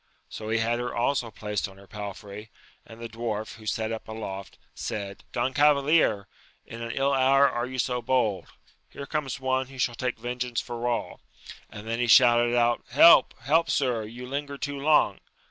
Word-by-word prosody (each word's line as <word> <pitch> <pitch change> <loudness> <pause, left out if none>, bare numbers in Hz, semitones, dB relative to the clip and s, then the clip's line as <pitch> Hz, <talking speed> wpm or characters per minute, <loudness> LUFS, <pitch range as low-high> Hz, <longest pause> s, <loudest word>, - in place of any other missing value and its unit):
So 110 0 -7
he 115 - +1
had 115 +1 0
her 120 - -3
also 120 0 0
placed 105 -2 -3
on 95 - -16
her 100 - -15
palfrey; 105 +2 -8 0.4
and 115 0 -13
the 115 - -6
dwarf, 110 -1 -5
who 110 -1 -13
sate 110 +1 -1
up 115 - -6
aloftj 100 -3 -7 0.2
said, 100 -1 -6
Don 125 +2 -1
Cavalier, 145 -7 +3 0.4
in 115 +1 -9
an 115 - -5
ill 135 +3 0
hour 135 +1 +5
are 120 -1 -2
you 130 0 -7
so 125 0 -1
bold: 115 -7 0 0.4
here 140 - -8
comes 140 -3 -3
one 130 0 0
who 135 0 -13
shall 125 -1 0
take 125 +1 -3
vengeance 125 0 -3
for 120 0 -4
all! 120 -1 -3 0.5
and 105 +1 -10
then 115 +1 -2
he 120 - +1
shouted 120 +1 +5
out, 120 0 +2
Help! 140 +2 +7
help, 160 +5 +2
sir, 125 -5 0
you 120 +4 -9
linger 140 +2 -5
too 145 0 -4
long 150 +2 +3
120 Hz, 185 wpm, -26 LUFS, 110-130 Hz, 0.5 s, Help